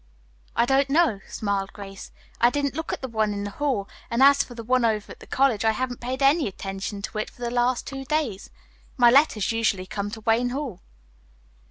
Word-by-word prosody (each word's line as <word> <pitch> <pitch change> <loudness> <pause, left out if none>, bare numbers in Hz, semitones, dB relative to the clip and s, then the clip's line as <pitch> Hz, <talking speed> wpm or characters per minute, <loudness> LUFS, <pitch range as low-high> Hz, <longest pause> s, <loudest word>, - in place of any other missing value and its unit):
"I 235 - +3
don't 270 +2 +2
know," 290 - +3
smiled 200 -2 -2
Grace. 195 -1 -9 0.3
"I 240 - +6
didn't 280 +1 -1
look 320 +3 -4
at - - -5
the - - -2
one 220 -3 0
in 200 0 -4
the 205 - -4
hall 250 -5 -1 0.2
and 235 +3 +2
as 280 0 +7
for 245 - -6
the 230 - -7
one 255 +2 +2
over 215 -2 0
at - - -11
the - - -14
college, 260 -6 +2
I 220 0 +3
haven't 245 +1 -3
paid 260 +3 -3
any 280 0 +4
attention 195 +1 -5
to 215 - -4
it 215 - -3
for 245 - -12
the 235 - -2
last 245 0 +1
two 270 -1 -6
days. 275 -9 -2 0.5
My 240 -2 +6
letters 260 -7 +4
usually 220 -5 0
come 200 +2 -4
to 220 +1 -8
Wayne 230 +3 +2
Hall." 255 -8 -4
235 Hz, 215 wpm, -25 LUFS, 205-270 Hz, 0.5 s, as